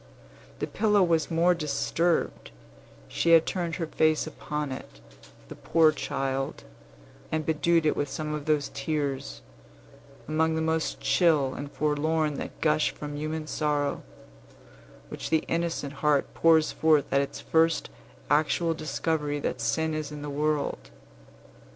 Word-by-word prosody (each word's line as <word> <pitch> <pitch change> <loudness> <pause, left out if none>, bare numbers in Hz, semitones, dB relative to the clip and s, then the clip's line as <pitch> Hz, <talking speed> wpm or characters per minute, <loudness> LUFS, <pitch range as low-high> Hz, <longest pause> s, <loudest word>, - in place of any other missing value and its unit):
The - - -2
pillow 210 -3 +2
was 165 -3 +1
more 170 +2 +3
disturbed; 155 +1 -1 0.6
she 170 - +2
had 165 -1 +7
turned 170 -3 -2
her 170 - -2
face 155 0 +1
upon 150 -2 -4
it, 130 - -9 0.5
the - - -8
poor 160 -2 +3
child, 135 -2 -3 0.7
and 155 -1 -1
bedewed 165 +1 +2
it 150 - +2
with 145 - -2
some 155 +1 -4
of 150 -1 -4
those 150 -2 +1
tears 140 -2 -3 0.9
(among 160 +1 +1
the - - 0
most 160 0 -1
chill 135 -1 +3
and 140 +2 -7
forlorn 155 +1 0
that - - -7
gush 150 -2 +3
from 145 +2 -7
human 155 +1 -3
sorrow) 150 -2 -1 1.1
which - - -6
the 160 -1 +2
innocent 165 -4 -2
heart 145 -1 +1
pours 160 -1 +4
forth 155 -2 +3
at 140 - +4
its 140 - -5
first 165 0 +2 0.4
actual 155 +3 +2
discovery 155 -1 -2
that 125 -3 -3
sin 155 +8 0
is 155 -1 -4
in 150 -1 -7
the 145 - -5
world. 150 0 -1
155 Hz, 140 wpm, -27 LUFS, 145-160 Hz, 1.1 s, had